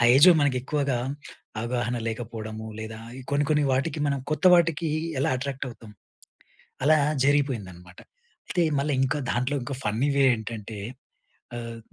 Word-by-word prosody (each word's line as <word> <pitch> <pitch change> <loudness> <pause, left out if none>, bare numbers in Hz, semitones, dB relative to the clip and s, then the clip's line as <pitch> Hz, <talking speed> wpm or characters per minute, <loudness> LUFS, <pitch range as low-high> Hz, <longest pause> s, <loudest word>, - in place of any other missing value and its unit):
ఆ - - +4
ఏజ్‌‌‌లో 170 +6 +8
మనకు 145 -3 +2
ఎక్కువగా 140 -2 0 0.6
అవగాహన 120 +1 -1
లేకపోవడము, 110 -1 -6
లేదా 110 0 -6 0.3
కొన్ని, 145 +1 +2
కొన్ని 150 -1 +3
వాటికి 140 +5 0
మనం 140 -1 0
కొత్త 155 - -1
వాటికి 165 -1 +2 0.3
ఎలా - - +2
అట్రాక్ట్ 135 +1 -4
అవుతాం, 115 -2 -12 0.9
అలా 155 +3 +6 0.3
జరిగిపోయిందన్నమాట. 105 -12 -1 0.5
అయితే 175 - +1 0.2
మళ్ళ 140 +2 -1
ఇంకా 140 +3 0
దాంట్లో 125 +4 0
ఇంకా 135 +2 -4
ఫన్నీ 115 +7 +1
వే 140 - +4
ఏంటంటే, 110 -1 -7 0.8
ఆహ్, 115 -1 -6
130 Hz, 135 wpm, -26 LUFS, 115-145 Hz, 0.9 s, ఏజ్‌‌‌లో